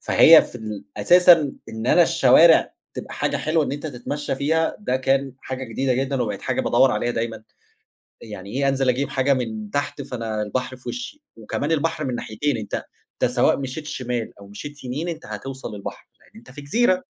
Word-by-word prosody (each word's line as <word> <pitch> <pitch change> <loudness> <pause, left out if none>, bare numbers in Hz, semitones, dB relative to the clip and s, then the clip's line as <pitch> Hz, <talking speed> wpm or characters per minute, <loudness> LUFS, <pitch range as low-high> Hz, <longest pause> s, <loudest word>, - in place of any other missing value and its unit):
فهي - - +7
في - - -11
ال 110 -4 -7
أساسًا 165 - +6 0.2
إن 110 +1 -6
أنا 175 - +6
الشوارع 160 +2 +5 0.2
تبقى - - -7
حاجة - - -1
حلوة 155 0 +1
إن 135 - -3
أنت 145 +2 -5
تتمشّى 145 +2 -4
فيها 160 +4 0
ده 130 -11 -1
كان 135 +1 0
حاجة 130 0 -5
جديدة 130 +2 -1
جدًا 135 0 -1
وبقِت 105 -4 -4
حاجة - - -1
بادوّر 135 - +4
عليها 120 +1 -1
دايمًا، 115 -1 -3 0.8
يعني 100 -3 -9
إيه 140 +3 0
أنزِل 135 -1 +1
أجيب 130 +3 0
حاجة 135 +1 +2
من 110 -5 -4
تحت 145 0 -2
فأنا 115 -5 -4
البحر 130 +4 -3
في 130 - -8
وشّي 255 +5 -6
وكمان 130 +7 -3
البحر 155 -1 0
من 130 -2 -2
ناحيتين، 130 +5 -2
أنت 105 -2 -4 0.3
أنت - - 0
سواء - - +3
مشيت 140 +3 -5
شِمال 125 -6 -4
أو 100 - -12
مشيت 145 +9 -9
يمين 135 +7 -4
أنت 165 - -6
هتوصَل 110 +3 -7
البحر، 100 - -8
لأن - - -25
أنت 120 +3 -15
في 145 - -10
جزيرة. 185 +6 +1
130 Hz, 190 wpm, -22 LUFS, 115-145 Hz, 0.8 s, فهي